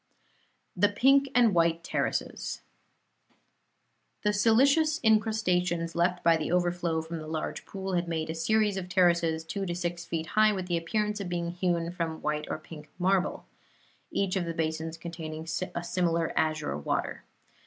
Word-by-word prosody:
THE 205 - +4
PINK 275 +6 +4
AND 235 -4 +5
WHITE 170 -1 +2
TERRACES - - -2 1.6
The 210 0 +2
silicious 275 +9 +4
incrustations 180 -6 +2
left 175 +1 +1
by 165 -1 +5
the 160 - -3
overflow 175 -2 0
from 165 +1 -6
the 155 - -8
large 155 0 -4
pool 190 -1 -5
had 175 -1 0
made 160 -1 -2
a - - -3
series 205 +5 +1
of 180 -1 -5
terraces, 170 -3 +2
two 195 +5 -4
to 175 - -2
six 175 -1 -3
feet 165 -2 -3
high, 215 0 +5
with 185 -2 -4
the 175 - 0
appearance 210 +5 -1
of 195 -3 -4
being 170 -1 -2
hewn 175 -1 -1
from 165 -2 -4
white 150 0 -1
or - - -2
pink 155 -1 -12
marble; 185 +1 +1 0.6
each 195 -1 0
of 185 -2 0
the 165 -1 -4
basins 160 0 -2
containing 165 -1 -7 0.3
a 170 - -2
similar 170 -2 0
azure 155 - 0
water. 75 - -2
175 Hz, 160 wpm, -29 LUFS, 165-195 Hz, 1.6 s, AND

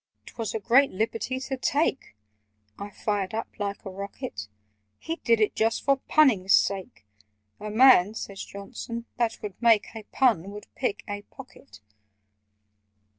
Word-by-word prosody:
"'Twas 225 -2 -5
a - - -1
great 250 +6 +4
liberty 225 +5 -2
to 265 0 -4
take!" 275 - -1 0.6
(I 200 - -6
fired 205 0 -2
up 225 - -3
like 200 0 -4
a 195 - -6
rocket). 185 - -7 0.5
"He 330 +1 -5
did 230 -7 +2
it 215 - +2
just 225 +1 0
for 275 -1 +3
punning's 220 -11 +4
sake: 190 - -1 0.5
'The 210 - -6
man,' 220 -3 +6
says 200 -3 -6
Johnson, 230 +4 -7
'that 235 -2 -1
would 205 0 -7
make 230 -3 +4
A 220 - -6
pun, 220 -9 +2
would 205 +1 -9
pick 250 -6 -2
a 205 -1 -5
pocket! 175 - -14
220 Hz, 145 wpm, -26 LUFS, 200-245 Hz, 0.6 s, man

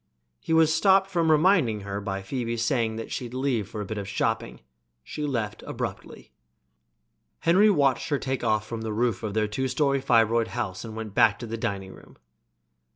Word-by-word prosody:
He - - -6
was 160 -1 +5
stopped 195 +3 +4
from 170 -3 +1
reminding 155 - +3
her 100 0 -5
by 95 -1 -4
Phoebe's 115 +1 -2
saying 115 -4 0
that 115 - -6
she'd 125 -1 -5
leave 125 -6 -1
for 110 -2 -5
a - - -4
bit 110 +1 -4
of 100 - -6
shopping. 105 - -2 0.4
She 150 - -4
left 110 -6 -3
abruptly. - - -6 1.1
Henry 190 +6 +5
watched 140 -9 +2
her 145 - +1
takeoff 125 -6 -1
from 115 0 -6
the 110 -1 -3
roof 115 -2 0
of 105 -2 -4
their 110 -1 +1
two 130 +6 -2
story 140 +1 +1
fibroid 115 -3 +3
house 95 -6 -3
and 110 -2 -8
went 110 -2 -6
back 105 0 +4
to 120 - -7
the 115 0 -4
dining 95 -4 -4
room. - - -17
115 Hz, 185 wpm, -26 LUFS, 105-140 Hz, 1.1 s, was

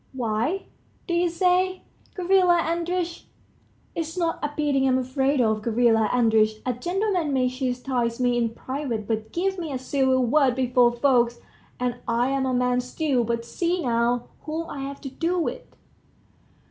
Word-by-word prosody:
"Why, 245 - -1 0.4
do 345 - -3
you 345 0 +2
say, 370 +2 +1 0.3
Gavrila 365 -2 +4
Andreitch? 340 +1 -2 0.7
It's 330 +1 -4
not 335 -2 0
a 295 - -1
beating 280 -3 +2
I'm 260 -1 +3
afraid 265 +2 0
of, 220 -3 +2
Gavrila 225 -1 +2
Andreitch. 220 -3 +3
A 250 - 0
gentleman 355 - -1
may 255 -1 +2
chastise 250 -2 -2
me 245 -1 +2
in 235 -1 +1
private, 240 -2 -4
but 220 -1 -2
give 380 +2 -1
me 325 -4 -4
a 265 - -2
civil 260 -1 +1
word 265 0 +3
before 250 -2 +3
folks, 240 -1 +2 0.4
and 245 -1 -1
I'm 265 +3 +1
a 255 - 0
man 250 0 +2
still; 255 0 0
but 235 0 -2
see 345 +8 -1
now, 240 0 +1 0.2
whom 320 +2 -3
I've 275 0 -6
to 270 - -6
do 335 +6 -1
with 330 - -2
260 Hz, 155 wpm, -24 LUFS, 240-330 Hz, 0.7 s, Gavrila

